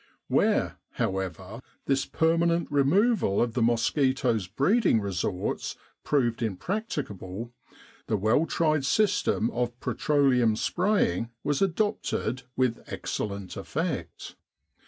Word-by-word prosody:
Where, - - +2 0.2
however, 95 +4 -3 0.2
this 135 -1 +1
permanent 170 +1 +1
removal 150 - +3
of 120 -1 +1
the 125 - -1
mosquitoes' 120 - +1
breeding 140 - +3
resorts 95 -2 -2 0.3
proved 120 -6 +1
imprac 150 - -2
ticable, 105 - -5 0.6
the 110 - +1
well 110 +11 +2
tried 155 -3 +1
system 195 - +2
of 120 0 -2
petroleum 130 -9 +2
spraying 175 - +1
was 145 -1 0
adopted 195 - 0 0.2
with 125 -3 +1
excellent 100 -3 -4
effect. - - -4
125 Hz, 100 wpm, -27 LUFS, 110-160 Hz, 0.6 s, removal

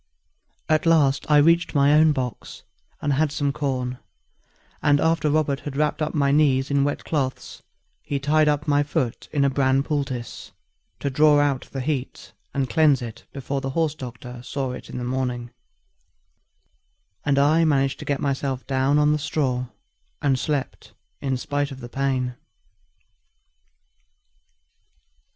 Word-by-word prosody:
At 155 +1 +2
last 145 -5 +3
I 150 - +6
reached 165 +3 +3
my 140 +1 +5
own 155 +1 +6
box, 125 -6 -5 0.4
and 145 - +1
had 150 +2 +1
some 145 -1 -1
corn; 130 -3 -2 0.8
and 145 -1 +3
after 160 -1 +2
Robert 145 -2 +1
had 140 +2 -6
wrapped 150 +1 0
up 155 +1 -2
my 140 -2 +2
knees 140 -2 +3
in 140 0 +3
wet 145 0 -2
cloths, 135 -5 -3 0.4
he 145 - -3
tied 150 +2 +2
up 150 +1 0
my 145 -1 +3
foot 145 -5 -2
in 140 -2 +2
a - - +4
bran 135 0 +2
poultice, 135 -5 -4 0.5
to 140 - -1
draw 150 +2 +5
out 140 -3 0
the 135 - -4
heat 135 -1 -4 0.2
and 140 -2 -1
cleanse 140 0 +3
it 115 -1 -9
before 140 0 -4
the 135 - -3
horse 160 -3 +1
doctor 125 -3 -9
saw 135 +1 -3
it - - -9
in - - -6
the 125 - -4
morning, 125 -1 -3 1.7
and 140 -1 +1
I 150 +4 +4
managed 135 -4 +1
to - - -7
get 140 -2 -1
myself 135 -2 -2
down 135 +2 +1
on 150 0 +4
the 150 - +1
straw, 135 -4 -1 0.5
and 135 -3 +1
slept 145 -2 -3 0.3
in 135 -2 -1
spite 145 +2 -2
of 135 -2 -9
the 120 -1 -9
pain. 130 -1 -1
140 Hz, 155 wpm, -23 LUFS, 130-150 Hz, 1.7 s, I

